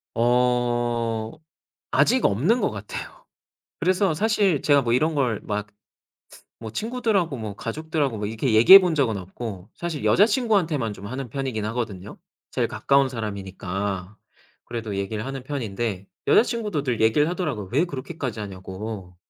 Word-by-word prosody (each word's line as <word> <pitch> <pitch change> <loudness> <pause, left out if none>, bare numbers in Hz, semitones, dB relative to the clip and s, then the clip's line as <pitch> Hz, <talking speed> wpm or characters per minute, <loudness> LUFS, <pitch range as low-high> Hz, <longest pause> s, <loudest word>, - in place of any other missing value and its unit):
어 120 -2 +1 0.6
아직 185 - +3
없는 175 - +2
것 - - +2
같아요. 105 -1 -8 0.5
그래서 185 +1 +2
사실 200 -4 +2
제가 145 -2 +4
뭐 120 -1 +1
이런 155 +5 +2
걸 125 -7 +1
막 105 0 -3 0.9
뭐 110 -1 -7
친구들하고 215 - -1
뭐 110 -3 -5
가족들하고 145 +2 -2
뭐 105 0 -3
이렇게 110 +2 -1
얘기해 120 - +11
본 180 -4 0
적은 120 -9 +1
없고 95 +1 -7
사실 170 -4 -4
여자친구한테만 195 - +2
좀 100 0 -9
하는 130 +3 -5
편이긴 125 -4 -3
하거든요 110 -4 -4 0.3
제일 - - 0
가까운 140 -1 +2
사람이니까. 100 -3 -4 0.5
그래도 110 -4 -5
얘기를 105 +3 -3
하는 135 -1 -5
편인데 115 -7 -3 0.2
여자친구도 215 - +2
늘 125 -5 -1
얘기를 130 +8 +4
하더라고요. 150 - -3
왜 145 +7 +3
그렇게까지 135 -6 -5
하냐고. 95 -1 -7
120 Hz, 335 characters per minute, -24 LUFS, 105-155 Hz, 0.9 s, 얘기해